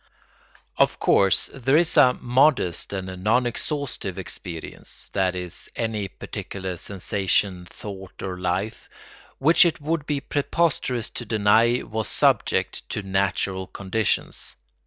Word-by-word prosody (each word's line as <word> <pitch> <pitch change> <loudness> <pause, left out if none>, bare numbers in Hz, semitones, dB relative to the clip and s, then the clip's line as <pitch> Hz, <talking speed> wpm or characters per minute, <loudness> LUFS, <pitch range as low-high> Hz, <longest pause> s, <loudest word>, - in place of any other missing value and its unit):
Of - - +3
course 95 -1 +3
there 135 +2 +2
is 170 +1 +2
a 130 -5 +6
modest 125 - +2
and 95 -1 -5
non 120 +4 +3
exhaustive 120 - -3
experience—that 90 +1 -4
is, 90 -2 -6
any 110 -3 -2
particular 95 0 -6
sensation, 95 0 0
thought, 95 -2 -9
or 90 -1 -4
life—which 105 - 0
it 170 -2 +1
would 150 0 -2
be 145 -2 0
preposterous 140 -5 0
to - - -5
deny 110 +3 +3
was 110 -2 -3
subject - - +1
to 110 - -3
natural 95 -1 -1
conditions. 100 +2 -2
105 Hz, 115 wpm, -24 LUFS, 95-125 Hz, -, a